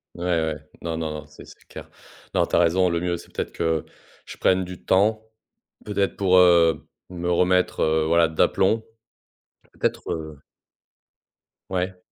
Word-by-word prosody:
Ouais, 85 Hz, -, -7 dB
ouais. 80 Hz, -3 st, 0 dB, 0.2 s
Non, 80 Hz, -1 st, -3 dB
non, 80 Hz, -1 st, -3 dB
non. 75 Hz, 0 st, -7 dB
C'est 75 Hz, -, -14 dB
c'est -, -, -17 dB
clair. -, -, -11 dB, 0.4 s
Non, -, -, +2 dB
tu -, -, -2 dB
as -, -, +4 dB
raison, 90 Hz, +2 st, +3 dB
le 85 Hz, -1 st, 0 dB
mieux 90 Hz, 0 st, -2 dB
c'est 85 Hz, -, -15 dB
peut-être -, -, -4 dB
que 80 Hz, -2 st, -1 dB, 0.4 s
je -, -, -10 dB
prenne 95 Hz, 0 st, +2 dB
du 90 Hz, 0 st, -10 dB
temps, 110 Hz, +3 st, +2 dB, 0.6 s
peut-être 100 Hz, -1 st, -1 dB
pour, 95 Hz, -2 st, +3 dB
heu, 85 Hz, -3 st, +4 dB, 0.2 s
me 90 Hz, -1 st, -3 dB
remettre, 90 Hz, +1 st, +2 dB
heu, 80 Hz, 0 st, +2 dB
voilà 85 Hz, 0 st, +4 dB
d'aplomb. 95 Hz, +7 st, +1 dB, 1.0 s
Peut-être, -, -, -1 dB
heu 80 Hz, -3 st, -6 dB, 1.3 s
Ouais. 90 Hz, 0 st, -2 dB
85 Hz, 160 wpm, -23 LUFS, 80-95 Hz, 1.3 s, as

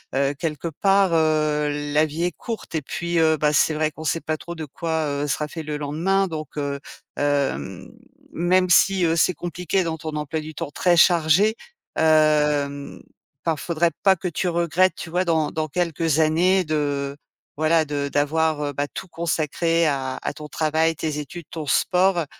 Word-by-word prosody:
heu, 140 Hz, +1 st, +1 dB
quelque 165 Hz, 0 st, -3 dB
part, 195 Hz, +3 st, +2 dB
heu, 155 Hz, -2 st, +2 dB, 0.2 s
la 150 Hz, +1 st, +4 dB
vie 155 Hz, +3 st, -4 dB
est 175 Hz, -, +1 dB
courte 225 Hz, +4 st, -7 dB
et 160 Hz, -, -1 dB
puis, 170 Hz, +4 st, -2 dB
heu, 160 Hz, -1 st, +3 dB
bah, 150 Hz, 0 st, +1 dB
c'est 155 Hz, +1 st, +3 dB
vrai 155 Hz, 0 st, 0 dB
qu'on 160 Hz, -, -10 dB
sait 165 Hz, +1 st, 0 dB
pas 155 Hz, 0 st, -2 dB
trop 170 Hz, +2 st, -8 dB
de 160 Hz, -1 st, -5 dB
quoi, 160 Hz, +2 st, -2 dB
heu, 145 Hz, 0 st, -2 dB
sera 150 Hz, +2 st, -1 dB
fait 160 Hz, +2 st, -7 dB
le 150 Hz, -1 st, -4 dB
lendemain. 170 Hz, +7 st, 0 dB
Donc, 155 Hz, -3 st, -7 dB
heu, 140 Hz, -1 st, -2 dB, 0.4 s
hem, 140 Hz, -, -1 dB, 0.4 s
même 180 Hz, +2 st, +2 dB
si, 190 Hz, +1 st, +4 dB
heu, 165 Hz, 0 st, +2 dB
c'est 175 Hz, +1 st, +2 dB
compliqué 180 Hz, +3 st, -2 dB
dans 165 Hz, -1 st, -3 dB
ton 155 Hz, -1 st, -5 dB
emploi 150 Hz, +1 st, -3 dB
du 155 Hz, 0 st, -8 dB
temps 140 Hz, -, -5 dB
très 175 Hz, +3 st, +2 dB
chargé, 175 Hz, +6 st, +4 dB, 0.4 s
hem, 150 Hz, -2 st, +2 dB, 0.4 s
pas, 165 Hz, -1 st, +1 dB
faudrait 170 Hz, +2 st, 0 dB
pas 195 Hz, -1 st, +5 dB
que 185 Hz, -, -5 dB
tu 175 Hz, +2 st, -2 dB
regrettes, 170 Hz, +2 st, +2 dB
tu 160 Hz, -, -8 dB
vois, 180 Hz, +2 st, +1 dB
dans 160 Hz, -3 st, +1 dB
dans 155 Hz, 0 st, -2 dB
quelques 165 Hz, -1 st, 0 dB
années 175 Hz, +5 st, +3 dB
de, 145 Hz, -3 st, -2 dB, 0.4 s
voilà, 155 Hz, +1 st, +2 dB
de 145 Hz, -1 st, -3 dB
d'avoir, 155 Hz, +1 st, +1 dB
heu, 145 Hz, 0 st, -3 dB
bah, 145 Hz, +1 st, -2 dB
tout -, -, -7 dB
consacré 165 Hz, 0 st, 0 dB
à 135 Hz, -3 st, -1 dB
à -, -, -2 dB
ton 150 Hz, -, -9 dB
travail, 160 Hz, +1 st, +1 dB
tes 150 Hz, -1 st, -3 dB
études, 170 Hz, +3 st, -8 dB
ton 155 Hz, -3 st, -6 dB
sport. 180 Hz, +1 st, +2 dB
160 Hz, 185 wpm, -23 LUFS, 150-170 Hz, 0.4 s, pas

